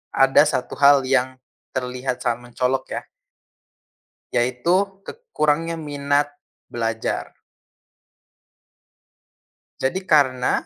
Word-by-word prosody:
Ada 135 +2 +6
1 130 - -2
hal 140 -1 +6
yang 130 0 +1 0.4
terlihat 125 0 -3
sangat 120 0 -3
mencolok 130 +1 0
ya. - - -6 1.3
Yaitu 170 +12 +1
ke - - -5 0.2
kurangnya 165 - 0
minat 145 -1 0 0.4
belajar. 115 -1 -3 2.4
Jadi 175 +9 0
karena 130 -7 +2
135 Hz, 85 wpm, -22 LUFS, 125-150 Hz, 2.4 s, Ada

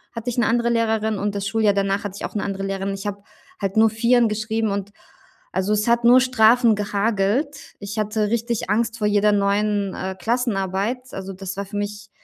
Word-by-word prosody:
hatte 230 +1 -4
ich 245 - -4
'ne 240 - +3
andere 235 +1 +1
Lehrerin 220 -2 0
und 205 0 -2
das 200 -1 -3
Schuljahr 220 -2 +2
danach 195 0 0
hatte 195 - -5
ich - - -4
auch - - -7
'ne 210 - -1
andere 195 -1 -4
Lehrerin. 195 0 -2
Ich 195 +1 -7
habe 200 0 -5 0.4
halt 195 -1 -2
nur 220 0 +6
Vierer 235 +2 +3
geschrieben 220 0 -1
und, 200 0 -3 0.6
also, 195 +3 0
es 210 +2 0
hat 235 0 +2
nur 250 +2 +7
Strafen 240 -2 +4
gehagelt. 210 +7 -1
Ich 205 +1 -5
hatte 215 0 0
richtig 235 -2 -2
Angst 230 +2 0
vor 210 - 0
jeder 210 0 +3
neuen, 200 0 +1
äh, 190 0 -4
Klassenarbeit. 220 -1 -1
Also, 195 0 -6
das 190 0 -7
war 200 - -3
für 200 +1 -7
mich 205 0 -5
210 Hz, 205 wpm, -22 LUFS, 200-230 Hz, 0.6 s, nur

